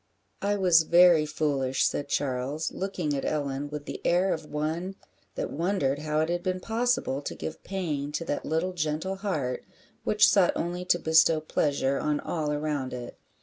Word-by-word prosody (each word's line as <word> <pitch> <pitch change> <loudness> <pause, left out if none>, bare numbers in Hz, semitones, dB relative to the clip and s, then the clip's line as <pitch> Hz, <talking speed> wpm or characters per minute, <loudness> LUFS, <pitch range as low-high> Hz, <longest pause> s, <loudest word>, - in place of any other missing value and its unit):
"I 205 +1 +1
was 180 -4 +5
very 170 -1 +5
foolish," 140 -4 0
said 145 - -1
Charles, 140 +3 -1
looking 180 -6 -2
at 135 - -2
Ellen 145 -1 -2
with 150 0 -6
the - - -6
air 180 +2 +3
of 155 -1 -6
one 160 +6 -3 0.4
that - - -3
wondered 160 -5 0
how 155 0 0
it 160 - 0
had 175 0 -1
been 185 0 -1
possible 230 - 0
to - - -5
give 160 - -6
pain 155 -7 -3
to 165 +2 -2
that 145 - -2
little 165 +4 -1
gentle 160 +3 -2
heart, 155 -11 -2 0.4
which 210 0 +5
sought 190 -3 +4
only 175 +2 -3
to 175 - +3
bestow 160 -1 +4
pleasure 140 -3 0
on 150 -1 0
all 155 -3 -2
around 150 -3 -2
it. 120 -1 -7
155 Hz, 175 wpm, -27 LUFS, 145-180 Hz, 0.4 s, was